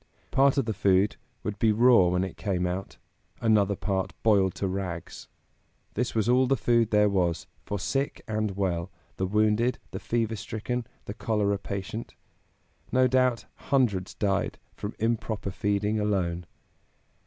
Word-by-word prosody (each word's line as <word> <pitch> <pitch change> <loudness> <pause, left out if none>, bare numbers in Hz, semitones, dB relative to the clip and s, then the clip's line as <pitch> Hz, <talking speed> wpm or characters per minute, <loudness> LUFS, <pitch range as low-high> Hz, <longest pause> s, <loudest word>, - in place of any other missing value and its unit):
Part 135 +1 +4
of 135 - +2
the 110 - -1
food 100 0 +2 0.3
would 105 -1 -4
be 110 - +4
raw 115 -3 +6
when 90 +1 +1
it 95 - -5
came 95 -4 -1
out, 90 +2 -4 0.4
another 105 -3 +3
part 95 -1 -2
boiled 100 -4 +3
to 100 - -2
rags. 90 -3 -5 0.7
This 125 +2 -2
was 110 0 +1
all 125 +1 +4
the 135 +1 +2
food 115 -2 +2
there 105 -1 +4
was, 90 -4 0 0.2
for 100 - -2
sick 135 +9 -2
and 110 -3 -2
well, 90 -2 -1 0.3
the 95 - 0
wounded, 110 +4 +2
the - - -5
fever 115 -1 -1
stricken, 115 +4 -4 0.2
the 100 - -5
cholera 105 -3 0
patient. 100 +3 -5 0.8
No 130 0 +4
doubt 130 -2 +2
hundreds 110 -9 0
died 100 -1 0 0.2
from 105 - -6
improper 110 -2 -1
feeding 105 +3 0
alone. 90 -5 -1
105 Hz, 150 wpm, -27 LUFS, 95-115 Hz, 0.8 s, raw